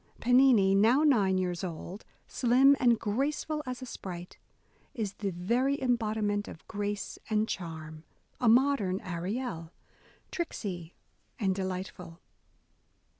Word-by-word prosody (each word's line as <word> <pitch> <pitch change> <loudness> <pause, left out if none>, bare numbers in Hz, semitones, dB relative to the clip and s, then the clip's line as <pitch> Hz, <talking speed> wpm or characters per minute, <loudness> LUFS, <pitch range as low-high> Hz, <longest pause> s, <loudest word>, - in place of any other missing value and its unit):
Pennini, 245 -6 +5
now 225 +9 +4
nine 205 -11 +3
years 180 -2 -2
old, 180 +3 -6 0.2
slim 260 +3 +4
and 240 -2 +4
graceful 285 +8 -1
as 255 0 -5
a - - -5
sprite, 180 -7 -8 0.6
is 210 -4 -3
the 200 - -3
very 235 +11 0
embodiment 215 -4 0
of 160 - -11
grace 205 -1 -4
and 215 0 +1
charm, 160 -4 -6 0.2
— - - -40
a 240 - +4
modern 235 -6 +3
Ariel, 180 0 -4 0.6
"tricksy" 185 - -5 0.4
and 195 -6 +1
delightful. 185 -2 -5
205 Hz, 120 wpm, -30 LUFS, 185-250 Hz, 0.6 s, Pennini